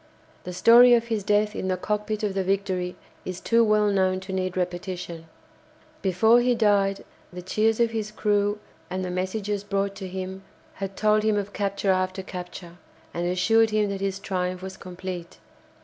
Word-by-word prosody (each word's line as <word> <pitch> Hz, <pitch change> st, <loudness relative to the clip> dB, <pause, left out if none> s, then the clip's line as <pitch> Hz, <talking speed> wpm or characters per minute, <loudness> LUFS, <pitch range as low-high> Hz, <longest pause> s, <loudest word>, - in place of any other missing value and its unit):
The 180 Hz, -, -5 dB
story 240 Hz, +6 st, +7 dB
of 235 Hz, 0 st, -1 dB
his 220 Hz, -3 st, -1 dB
death 210 Hz, +1 st, +1 dB
in 185 Hz, -, -3 dB
the 185 Hz, -1 st, 0 dB
cockpit 210 Hz, +2 st, -2 dB
of 205 Hz, -2 st, 0 dB
the 195 Hz, 0 st, 0 dB
"Victory" 185 Hz, -2 st, -1 dB, 0.3 s
is 185 Hz, 0 st, -5 dB
too 230 Hz, +4 st, +3 dB
well 210 Hz, -1 st, +3 dB
known 185 Hz, -1 st, +2 dB
to 190 Hz, 0 st, -7 dB
need 185 Hz, -1 st, -2 dB
repetition. 175 Hz, -2 st, -4 dB, 0.7 s
Before 215 Hz, +5 st, +4 dB
he 245 Hz, 0 st, +2 dB
died 200 Hz, -3 st, +2 dB, 0.3 s
the 180 Hz, 0 st, -8 dB
cheers 215 Hz, +4 st, +1 dB
of 235 Hz, -1 st, +3 dB
his 220 Hz, -2 st, -3 dB
crew 205 Hz, -1 st, +1 dB, 0.3 s
and 185 Hz, 0 st, -3 dB
the 180 Hz, -, -4 dB
messages 195 Hz, +2 st, -2 dB
brought 200 Hz, -1 st, -1 dB
to 190 Hz, -, -6 dB
him 190 Hz, +1 st, -6 dB, 0.3 s
had 195 Hz, 0 st, -6 dB
told 215 Hz, 0 st, +3 dB
him 215 Hz, -1 st, +1 dB
of 205 Hz, 0 st, -3 dB
capture 200 Hz, -1 st, 0 dB
after 185 Hz, 0 st, -1 dB
capture, 180 Hz, -2 st, -8 dB, 0.4 s
and 175 Hz, +1 st, -2 dB
assured 225 Hz, +5 st, +3 dB
him 210 Hz, -1 st, +1 dB
that 195 Hz, -1 st, -4 dB
his 195 Hz, -1 st, -1 dB
triumph 185 Hz, -2 st, -3 dB
was 190 Hz, 0 st, -6 dB
complete. 180 Hz, -2 st, -7 dB
195 Hz, 180 wpm, -25 LUFS, 185-210 Hz, 0.7 s, story